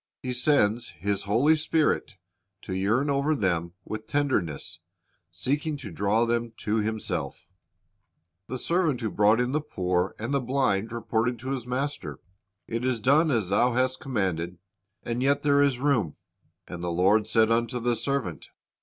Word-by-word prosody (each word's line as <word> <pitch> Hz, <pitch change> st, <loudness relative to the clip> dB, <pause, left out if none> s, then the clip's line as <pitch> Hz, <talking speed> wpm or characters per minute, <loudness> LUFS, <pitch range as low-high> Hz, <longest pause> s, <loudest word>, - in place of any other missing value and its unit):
He 125 Hz, -1 st, -2 dB
sends 120 Hz, -3 st, +2 dB
His 100 Hz, 0 st, -1 dB
Holy 125 Hz, +10 st, +4 dB
Spirit 155 Hz, -8 st, 0 dB, 0.5 s
to 95 Hz, -, -5 dB
yearn 105 Hz, +9 st, +1 dB
over 140 Hz, +3 st, +1 dB
them 85 Hz, -, -1 dB
with 110 Hz, 0 st, -6 dB
tenderness, 120 Hz, -, -1 dB, 0.5 s
seeking 145 Hz, +3 st, -2 dB
to 115 Hz, -8 st, -8 dB
draw 100 Hz, +7 st, +1 dB
them 120 Hz, 0 st, -1 dB
to 110 Hz, +1 st, 0 dB
Himself 110 Hz, 0 st, -2 dB, 1.0 s
The 130 Hz, -, -4 dB
servant 160 Hz, -2 st, 0 dB
who 110 Hz, -3 st, -2 dB
brought 105 Hz, +2 st, +4 dB
in 125 Hz, +1 st, +1 dB
the 155 Hz, +2 st, 0 dB
poor 90 Hz, -7 st, -1 dB
and 120 Hz, +6 st, -3 dB
the 140 Hz, -, +2 dB
blind 125 Hz, -5 st, 0 dB
reported 115 Hz, +1 st, -1 dB
to 130 Hz, +2 st, -4 dB
his 125 Hz, -3 st, -4 dB
master, 125 Hz, -, -3 dB, 0.5 s
"It 115 Hz, +1 st, -3 dB
is 130 Hz, -2 st, 0 dB
done 145 Hz, +8 st, +4 dB
as 110 Hz, -9 st, 0 dB
thou 120 Hz, +5 st, +3 dB
hast 130 Hz, +1 st, +1 dB
commanded, 90 Hz, -8 st, -2 dB, 0.5 s
and 120 Hz, +1 st, -2 dB
yet 140 Hz, +2 st, +2 dB
there 145 Hz, -1 st, +4 dB
is 140 Hz, -3 st, +3 dB
room. 125 Hz, -, +1 dB, 0.5 s
And 85 Hz, 0 st, -7 dB
the 90 Hz, -, -1 dB
lord 95 Hz, +5 st, +3 dB
said 110 Hz, 0 st, +3 dB
unto 120 Hz, +1 st, +1 dB
the 120 Hz, 0 st, +1 dB
servant. 115 Hz, -, -3 dB
120 Hz, 160 wpm, -27 LUFS, 105-135 Hz, 1.0 s, Holy